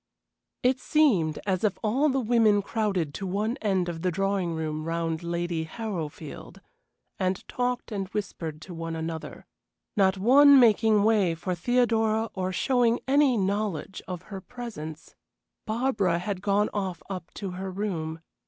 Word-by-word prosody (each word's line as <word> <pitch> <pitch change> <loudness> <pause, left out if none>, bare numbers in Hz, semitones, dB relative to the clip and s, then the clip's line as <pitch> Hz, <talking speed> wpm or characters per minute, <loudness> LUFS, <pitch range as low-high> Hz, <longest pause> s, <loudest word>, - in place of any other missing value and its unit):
It 255 +1 +3
seemed 205 - +2
as 190 -1 0
if 210 -3 +1
all 260 +8 +2
the 270 0 +1
women 220 -4 +3
crowded 195 -9 -1
to 195 - -4
one 210 +5 -1
end 190 -7 0
of 165 -2 -4
the 180 - +1
drawing 195 -2 0
room 155 -1 -3
round 165 -1 -2
Lady 170 -1 -2
Harrowfield, 160 -7 -6 0.6
and 185 0 -1
talked 250 -1 -2
and 195 -2 -3
whispered 165 -6 -5
to 180 - -9
one 165 0 -4
another, 160 0 -5 0.5
not 195 -1 +3
one 275 +7 +7
making 220 -3 +5
way 205 -6 +3
for 180 +3 -3
Theodora 225 +2 +1
or 185 -1 -2
showing 240 +3 +2
any 275 -2 +4
knowledge 195 -2 -2
of 180 -2 -5
her 190 - -5
presence. 185 -10 -8 0.5
Barbara 215 -7 +1
had 185 +1 -3
gone 205 +1 +1
off 190 -4 -3
up 185 -3 -6
to 195 -3 -4
her 190 +1 -5
room. 170 -5 -3
195 Hz, 150 wpm, -27 LUFS, 170-225 Hz, 0.6 s, one